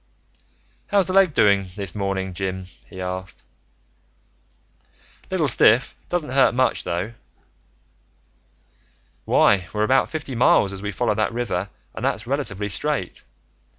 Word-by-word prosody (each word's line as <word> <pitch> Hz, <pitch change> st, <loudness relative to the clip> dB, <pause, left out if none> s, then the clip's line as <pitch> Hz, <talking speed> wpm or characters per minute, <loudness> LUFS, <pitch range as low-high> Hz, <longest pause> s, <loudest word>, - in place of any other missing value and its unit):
"How's 200 Hz, -2 st, +2 dB
the 185 Hz, -, -3 dB
leg 190 Hz, -5 st, +4 dB
this 100 Hz, -3 st, +2 dB
morning, 95 Hz, -2 st, -2 dB
Jim?" 95 Hz, +1 st, -3 dB, 0.2 s
he 95 Hz, -, -11 dB
asked. 90 Hz, 0 st, -6 dB, 1.9 s
"Little 180 Hz, -5 st, +1 dB
stiff. 120 Hz, 0 st, +4 dB
Doesn't 170 Hz, -7 st, -2 dB
hurt 130 Hz, -3 st, +4 dB
much, 130 Hz, 0 st, +1 dB
though." 90 Hz, +6 st, -3 dB, 2.1 s
"Why, 95 Hz, -4 st, +3 dB
we're 105 Hz, 0 st, -1 dB
about 130 Hz, +4 st, +3 dB
fifty 150 Hz, -4 st, -5 dB
miles, 110 Hz, -4 st, +3 dB
as 95 Hz, -, -6 dB
we 105 Hz, 0 st, -3 dB
follow 105 Hz, -, 0 dB
that 110 Hz, 0 st, 0 dB
river, 105 Hz, -5 st, -2 dB, 0.2 s
and -, -, -7 dB
that's 110 Hz, -, -1 dB
relatively 115 Hz, -7 st, -2 dB
straight." 95 Hz, -6 st, -2 dB
105 Hz, 120 wpm, -22 LUFS, 95-130 Hz, 2.1 s, leg